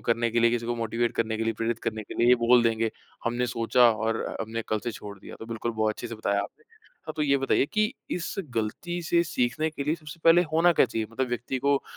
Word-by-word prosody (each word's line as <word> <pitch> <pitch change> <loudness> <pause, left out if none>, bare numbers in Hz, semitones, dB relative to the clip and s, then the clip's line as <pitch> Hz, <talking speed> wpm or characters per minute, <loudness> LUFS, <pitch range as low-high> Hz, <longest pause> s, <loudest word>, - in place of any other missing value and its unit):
करने 115 0 -1
के 120 +1 +1
लिए, 115 - +5
किसी 120 -1 -1
को 120 - -1
मोटिवेट 115 +1 -1
करने 110 -1 0
के 115 - -2
लिए, 115 - +1
प्रेरित 115 +1 -2
करने 110 -1 -2
के - - -10
लिए 120 - +4
ये 125 - +8
बोल 120 0 +6
देंगे, 115 -1 +1 0.3
हमने 120 +1 0
सोचा 120 0 +4
और 110 +1 -1 0.2
हमने 115 +1 -3
कल 110 - +1
से 120 - -1
छोड़ 100 -1 -9
दिया। - - -11
तो 115 - -8
बिल्कुल 115 0 -3
बहुत 110 -1 +1
अच्छे - - -6
से - - -6
बताया 100 -2 0
आपने। 445 - -11 0.4
हाँ, 155 - -4
तो 155 - 0
ये 140 -2 +3
बताइए 135 0 +2
कि 215 +3 +2 0.2
इस 175 -1 -3 0.2
गलती 175 +11 -2
से 170 +1 +2
सीखने 155 +1 0
के 140 -2 -5
लिए 150 - +1
सबसे 155 0 -11
पहले 170 +2 +7
होना 170 +2 +5
क्या 160 - +4
चाहिए? 110 -2 -3
मतलब 130 +2 -2
व्यक्ति 120 +2 -3
को 140 +1 +2
120 Hz, 250 wpm, -27 LUFS, 115-140 Hz, 0.4 s, ये